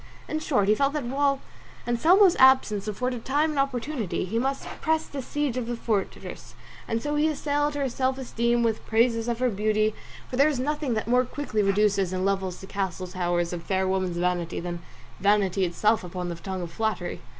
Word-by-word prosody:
In 310 Hz, -, -2 dB
short 250 Hz, -10 st, +1 dB
he 210 Hz, -, +5 dB
felt 275 Hz, +5 st, +1 dB
that 300 Hz, -2 st, -2 dB
while 275 Hz, +2 st, +1 dB, 0.4 s
Anselmo's 340 Hz, -, +5 dB
absence 260 Hz, -6 st, +5 dB
afforded 245 Hz, +3 st, -2 dB
time 295 Hz, +4 st, +1 dB
and 295 Hz, -, -2 dB
opportunity 250 Hz, -, -1 dB
he 220 Hz, +5 st, -1 dB
must 270 Hz, +2 st, -1 dB, 0.2 s
press 320 Hz, 0 st, +1 dB
the 280 Hz, -, -6 dB
siege 285 Hz, -1 st, -2 dB
of 245 Hz, -2 st, -2 dB
the 240 Hz, -, -2 dB
fortress, 215 Hz, -4 st, -4 dB, 0.3 s
and 225 Hz, 0 st, -2 dB
so 295 Hz, -, -1 dB
he 295 Hz, +1 st, +3 dB
assailed 290 Hz, -1 st, 0 dB
her 280 Hz, -2 st, 0 dB
self 260 Hz, +1 st, -1 dB
esteem 235 Hz, -2 st, 0 dB
with 225 Hz, -2 st, 0 dB
praises 230 Hz, 0 st, +2 dB
of 235 Hz, -1 st, -1 dB
her 250 Hz, 0 st, +1 dB
beauty, 215 Hz, +1 st, +1 dB, 0.3 s
for 250 Hz, -, -5 dB
there 280 Hz, +3 st, +5 dB
is 280 Hz, -5 st, -2 dB
nothing 295 Hz, -2 st, -1 dB
that 215 Hz, -, -2 dB
more 250 Hz, +1 st, +4 dB
quickly 255 Hz, -4 st, -2 dB
reduces 195 Hz, -2 st, +2 dB
and 185 Hz, 0 st, -1 dB
levels 190 Hz, -2 st, -1 dB
the -, -, -8 dB
castle 190 Hz, -2 st, -3 dB
towers 175 Hz, -1 st, -1 dB
of 175 Hz, -, -4 dB
fair 190 Hz, +2 st, 0 dB
women's 185 Hz, -2 st, -1 dB
vanity 175 Hz, -1 st, -1 dB
than 175 Hz, 0 st, -5 dB, 0.4 s
vanity 200 Hz, -1 st, +2 dB
itself 210 Hz, +5 st, +1 dB
upon 180 Hz, 0 st, -5 dB
the 170 Hz, -, -4 dB
tongue 185 Hz, +2 st, -5 dB
of 170 Hz, -, -7 dB
flattery. 215 Hz, -2 st, -2 dB
225 Hz, 195 wpm, -26 LUFS, 190-270 Hz, 0.4 s, he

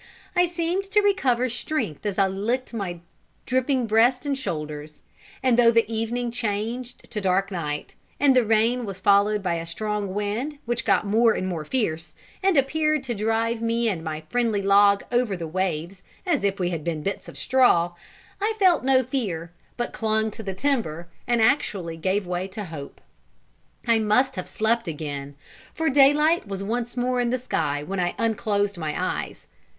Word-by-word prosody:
I 355 Hz, 0 st, +4 dB
seemed 345 Hz, +3 st, -1 dB
to 420 Hz, +2 st, +3 dB
recover 255 Hz, -12 st, +2 dB
strength 240 Hz, -, -3 dB
as 200 Hz, -, -3 dB
I 195 Hz, -, +4 dB
licked 225 Hz, +7 st, -2 dB
my 180 Hz, -6 st, -4 dB, 0.4 s
dripping 260 Hz, 0 st, +1 dB
breast 235 Hz, +5 st, +3 dB
and 285 Hz, -1 st, 0 dB
shoulders; 150 Hz, -, -5 dB, 0.4 s
and 250 Hz, -2 st, +3 dB
though 230 Hz, -1 st, +7 dB
evening 230 Hz, +2 st, -2 dB
changed 230 Hz, +2 st, -4 dB
to 210 Hz, -, -3 dB
dark 195 Hz, +1 st, +1 dB
night, 150 Hz, -5 st, -4 dB, 0.3 s
and 275 Hz, -2 st, +5 dB
the 250 Hz, -, +5 dB
rain 225 Hz, +3 st, +2 dB
was 195 Hz, -1 st, -6 dB
followed 200 Hz, +1 st, +3 dB
by 180 Hz, -2 st, 0 dB
a 165 Hz, 0 st, -5 dB
strong 205 Hz, +2 st, -3 dB
wind, 220 Hz, +9 st, -2 dB
which 240 Hz, 0 st, -2 dB
got -, -, +3 dB
more 225 Hz, +3 st, +4 dB
and 185 Hz, -, -2 dB
more 170 Hz, -4 st, -3 dB
fierce, 165 Hz, -, -2 dB, 0.3 s
and 385 Hz, -4 st, +3 dB
appeared 305 Hz, +2 st, +2 dB
to 250 Hz, -2 st, -3 dB
drive 225 Hz, +2 st, 0 dB
me 230 Hz, +1 st, +1 dB
and 170 Hz, -6 st, -3 dB
my 155 Hz, -1 st, -4 dB
friendly 230 Hz, -1 st, 0 dB
log 200 Hz, 0 st, +5 dB
over 240 Hz, -5 st, +1 dB
the 165 Hz, -2 st, -5 dB
waves 180 Hz, +1 st, -2 dB, 0.2 s
as 335 Hz, -, +1 dB
if 200 Hz, -1 st, 0 dB
we 180 Hz, -1 st, 0 dB
had 165 Hz, -3 st, -3 dB
been 160 Hz, -2 st, -3 dB
bits 195 Hz, -, -4 dB
of -, -, -12 dB
straw, 210 Hz, -10 st, +3 dB, 0.5 s
I 435 Hz, +2 st, 0 dB
felt 370 Hz, -8 st, +4 dB
no 260 Hz, 0 st, +4 dB
fear, 200 Hz, -11 st, -3 dB, 0.3 s
but 240 Hz, -, -3 dB
clung 220 Hz, 0 st, 0 dB
to 220 Hz, -, -8 dB
the 195 Hz, -3 st, -5 dB
timber, 190 Hz, -, -1 dB, 0.2 s
and 235 Hz, -2 st, +3 dB
actually 195 Hz, -, +1 dB
gave 190 Hz, +4 st, 0 dB
way 180 Hz, +1 st, -2 dB
to 205 Hz, +2 st, -6 dB
hope. 155 Hz, -5 st, -9 dB, 0.8 s
I 230 Hz, -1 st, +4 dB
must 220 Hz, +5 st, +2 dB
have 185 Hz, -, -5 dB
slept 230 Hz, 0 st, 0 dB
again, 145 Hz, -3 st, -5 dB, 0.4 s
for 320 Hz, -2 st, +1 dB
daylight 290 Hz, +2 st, +4 dB
was 195 Hz, -1 st, -4 dB
once 240 Hz, +4 st, -3 dB
more 250 Hz, 0 st, +1 dB
in 240 Hz, -, +1 dB
the 255 Hz, -, +1 dB
sky 150 Hz, -, -1 dB
when 190 Hz, +5 st, -4 dB
I 175 Hz, -1 st, 0 dB
unclosed 205 Hz, -3 st, 0 dB
my 155 Hz, -2 st, -3 dB
eyes. -, -, -3 dB
220 Hz, 175 wpm, -24 LUFS, 185-250 Hz, 0.8 s, though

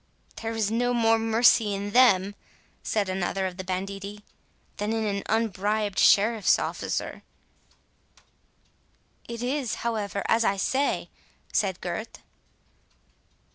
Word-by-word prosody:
"There 225 Hz, 0 st, -3 dB
is 220 Hz, -2 st, -1 dB
no 245 Hz, +2 st, +1 dB
more 225 Hz, -1 st, +3 dB
mercy 225 Hz, -2 st, +3 dB
in 200 Hz, +1 st, -4 dB
them," 205 Hz, -5 st, +4 dB, 0.5 s
said 210 Hz, -3 st, -1 dB
another 190 Hz, +1 st, -2 dB
of 180 Hz, -1 st, -4 dB
the 185 Hz, -, -5 dB
banditti, 195 Hz, +2 st, -5 dB, 0.5 s
"than 210 Hz, +2 st, -2 dB
in 225 Hz, -1 st, -1 dB
an 200 Hz, -1 st, -1 dB
unbribed 210 Hz, -2 st, 0 dB
sheriffs 215 Hz, +1 st, +4 dB
officer." -, -, -3 dB, 2.1 s
"It 235 Hz, 0 st, -5 dB
is, 260 Hz, -1 st, -1 dB
however, 210 Hz, -4 st, -2 dB
as 230 Hz, +1 st, +3 dB
I 200 Hz, -2 st, +1 dB
say," 270 Hz, +8 st, 0 dB, 0.4 s
said 190 Hz, -3 st, 0 dB
Gurth. 180 Hz, +6 st, -5 dB
210 Hz, 115 wpm, -26 LUFS, 195-225 Hz, 2.1 s, them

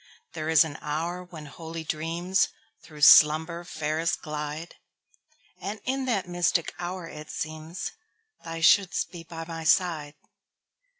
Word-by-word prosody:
There 155 Hz, 0 st, -3 dB
is 160 Hz, 0 st, +7 dB
an 155 Hz, -3 st, -7 dB
hour 165 Hz, +4 st, -3 dB
when 165 Hz, -4 st, -10 dB
holy 160 Hz, +3 st, -8 dB
dreamsThrough 165 Hz, +1 st, -2 dB
slumber 160 Hz, +4 st, +7 dB
fairest 160 Hz, 0 st, -2 dB
glide; 150 Hz, +1 st, -5 dB, 0.9 s
And 205 Hz, +2 st, -4 dB
in 265 Hz, +1 st, -1 dB
that 210 Hz, -8 st, 0 dB
mystic 175 Hz, -1 st, +1 dB
hour 175 Hz, 0 st, -4 dB
it 150 Hz, -1 st, -9 dB
seemsThou 165 Hz, -, -7 dB
shouldst 185 Hz, 0 st, +4 dB
be 170 Hz, -2 st, -9 dB
by 165 Hz, -1 st, -7 dB
my 165 Hz, -1 st, -6 dB
side. 160 Hz, -4 st, +2 dB
165 Hz, 120 wpm, -27 LUFS, 155-180 Hz, 0.9 s, is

